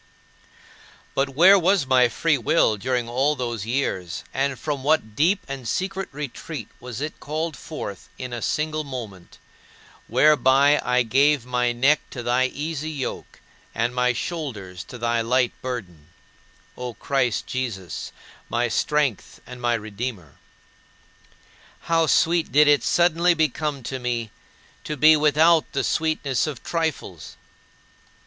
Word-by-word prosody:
But 135 0 0
where 180 +8 +6
was 185 -2 +2
my 130 -2 +4
free 155 +2 +1
will 110 -1 +3
during 120 +2 -2
all 135 +5 +1
those 120 -5 -4
years 95 -9 -2
and 135 0 -1
from 145 -2 -4
what 140 -8 +1
deep 180 - +2
and 135 -3 -6
secret 195 - -2
retreat 140 -3 -7
was 125 0 -7
it 155 +1 -5
called 155 +1 -3
forth 120 - -8
in 125 -1 -6
a 120 - -4
single 155 +3 -1
moment, 115 -10 -8 0.7
whereby 140 +2 +4
I 125 0 +2
gave 135 +3 +3
my 125 -1 0
neck 135 +5 +3
to 120 - -7
thy 125 +2 +2
"easy 155 +2 -4
yoke" 145 -4 -6 0.3
and 120 +2 0
my 125 0 +2
shoulders 115 - -5
to 125 - -10
thy 120 0 0
"light 125 +2 +1
burden," 95 -12 -6 0.7
O 125 -2 -6
Christ 125 -1 0
Jesus, 105 - -5 0.4
"my 120 0 0
Strength 145 -2 -1
and 125 0 -10
my 120 -1 +2
Redeemer"? 105 - -6 1.4
How 165 -1 +1
sweet 165 +2 +2
did 150 +1 +5
it 145 -1 +5
suddenly 175 0 +3
become 150 -2 -1
to 130 +2 -4
me 120 -3 -3 0.5
to 150 - -4
be 155 +4 +7
without 155 +2 +4
the - - 0
sweetness 155 -4 0
of 145 -6 -6
trifles! 160 - -4
130 Hz, 135 wpm, -23 LUFS, 120-150 Hz, 1.4 s, be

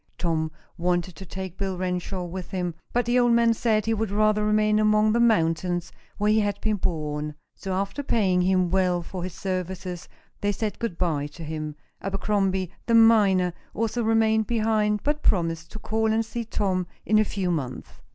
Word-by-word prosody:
Tom 160 -2 0 0.3
wanted 175 0 0
to 190 - -10
take 190 +1 -7
Bill 190 -2 -2
Renshaw 180 0 -2
with 180 +1 -6
him, 180 -2 -2 0.2
but 245 -1 +1
the 240 +1 +3
old 240 -1 +4
man 235 0 +4
said 220 -2 +1
he 225 - +1
would 220 -1 -1
rather 210 +1 +2
remain 215 0 +3
among 215 0 +4
the 235 - +2
mountains 175 -5 +2 0.3
where 210 0 +2
he 220 - +4
had 205 -1 0
been 215 -1 0
born. 150 -4 -2 0.2
So, 190 -1 -5
after 200 +8 -2
paying 195 -9 +2
him 185 -1 +2
well 180 -2 +2
for 180 +2 -6
his 180 -2 -5
services, 185 -1 -4 0.3
they 205 0 0
said 210 +1 -3
good 230 -8 -3
by 155 -5 0
to 150 +3 -11
him. 155 -1 -5 0.3
Abercrombie, 195 -2 0 0.2
the 230 - +4
miner, 205 -6 +5 0.2
also 230 +2 -1
remained 220 -1 +2
behind, 215 -2 +1
but 295 +1 0
promised 165 -4 0
to - - -6
call 220 +1 0
and 225 +1 +1
see 230 +1 -4
Tom 190 -4 -1 0.2
in 215 0 +4
a - - +5
few 195 -3 -2
months. 135 -7 -3
195 Hz, 185 wpm, -25 LUFS, 180-215 Hz, 0.3 s, miner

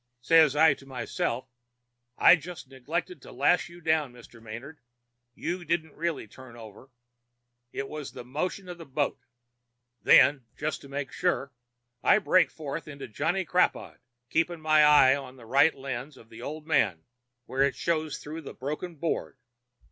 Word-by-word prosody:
Says 155 +2 +5
I 155 0 +6
to 135 0 -15
myself: 130 0 -3 0.7
'I - - +8
just 165 -1 -9
neglected 135 - -4
to - - -12
lash - - +2
you 175 0 -14
down, 155 -4 +1
Mr. 120 -1 -15
Manard; 120 +8 -9 0.6
you 175 +2 -3
didn't 160 -2 -1
really 165 -7 -3
turn 125 +2 -14
over. 115 +2 -13 0.8
It 135 - -4
was 150 -1 -7
the - - -9
motion 180 +8 -3
of 175 -1 -8
the 165 - -9
boat.' 140 +1 -2 0.7
Then, 135 +4 +6
just 150 0 -3
to 140 - -13
make 140 -1 -4
sure, 140 -7 -1 0.5
I - - +5
break 185 -3 +3
forth 155 0 -6
into 140 -2 -8
'Johnny 165 - -1
Crapaud,' 180 +3 0 0.3
keeping 165 +1 +1
my 155 0 +4
eye 145 -3 +7
on 135 -2 -8
the 120 -3 -14
right 140 +7 +4
lens 135 +1 -6
of 115 - -17
the 110 - -11
old 155 +1 -6
man 95 - +1 0.4
where 135 - -2
it 140 -2 +3
showed 155 -1 -1
through 155 +2 -7
the 140 - -10
broken 150 +7 -5
board. 160 -2 -3
145 Hz, 165 wpm, -28 LUFS, 130-165 Hz, 0.8 s, I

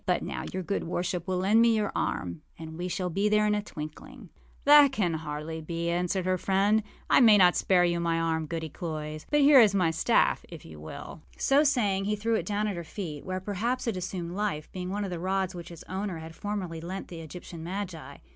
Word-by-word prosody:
But - - +1
now - - -4
your 185 0 -3
good 200 +3 -2
worship 175 +1 -2
will 185 -1 0
lend 200 +5 +4
me 230 -1 +5
your 210 -2 0
arm, 85 -3 -2 0.2
and 160 -1 -8
we 175 +2 -4
shall 180 0 -2
be 200 +5 +1
there 210 0 +3
in 210 - +2
a 210 - 0
twinkling.â 155 -6 -9 0.4
âThat 290 -1 +8
can 190 -9 0
hardly 155 +1 -5
be,â 170 +1 -3
answered 180 +1 -1
her 185 0 +1
friend. 200 +4 +2 0.3
âI - - +7
may 220 -3 +8
not 180 -2 +6
spare 180 -2 +3
you 170 0 +1
my 165 -1 0
arm, 160 -1 -1
Goody 160 0 -4
Cloyse; 155 -1 -6
but 295 0 +3
here 280 -1 +8
is 210 -4 +6
my 180 -4 +3
staff, 165 - +2
if - - -10
you 80 -1 -11
will.â 80 - -9 0.2
So 280 +2 +4
saying, 210 -9 +1
he 210 +1 0
threw 225 +2 -1
it 220 - 0
down 210 0 0
at 205 - -2
her 170 - -4
feet, 160 -4 -6
where, 185 0 -3
perhaps, 210 +6 -2
it 230 -4 -1
assumed 180 -2 -4
life, 185 -6 -3
being 180 -1 -5
one 205 +2 -2
of 195 - -4
the 175 - -4
rods 190 +1 -1
which 175 -1 -8
its 170 -2 -10
owner 190 -1 -3
had 160 0 -9
formerly 185 -5 -4
lent 185 +3 -6
to 175 - -8
the - - -7
Egyptian 165 +1 -9
magi. 180 -2 -6
185 Hz, 230 wpm, -28 LUFS, 165-205 Hz, 0.4 s, âThat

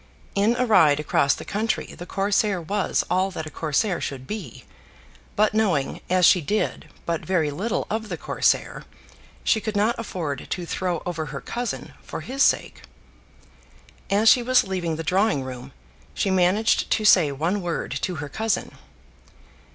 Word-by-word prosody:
In 205 +4 +2
a 250 +1 +1
ride 165 -10 +5
across 140 -2 +2
the - - -9
country 215 +3 -1
the 175 - -9
Corsair 200 0 +1
was 195 +5 0
all 185 +2 +1
that 160 -4 -6
a 155 - -8
Corsair 165 +5 0
should 130 -2 -5
be; 195 - -7 0.7
but 215 0 +3
knowing, 190 -11 0
as 185 -1 +4
she 180 - +6
did, 210 +8 -2 0.2
but 165 -1 -2
very 165 -6 +1
little 200 +10 -2
of 220 0 -3
the 175 - -3
Corsair, - - 0 0.6
she 220 - +2
could 215 0 -4
not 210 +3 +2
afford 165 - -4
to 180 - -3
throw 175 -1 -2
over 160 -3 -3
her - - -6
cousin 240 0 -5
for - - -7
his 270 +2 -4
sake. - - +2 1.3
As 205 +3 +2
she 245 - +7
was 255 +1 +4
leaving 180 -4 -2
the 165 - -5
drawing 180 -4 +1
room, 130 0 -8 0.4
she 195 - 0
managed 190 +4 +2
to 215 - +1
say 180 -8 +6
one 165 +9 -1
word 175 -2 -3
to 180 - -2
her 145 -2 -5
cousin. 220 +9 -2
185 Hz, 165 wpm, -24 LUFS, 160-215 Hz, 1.3 s, she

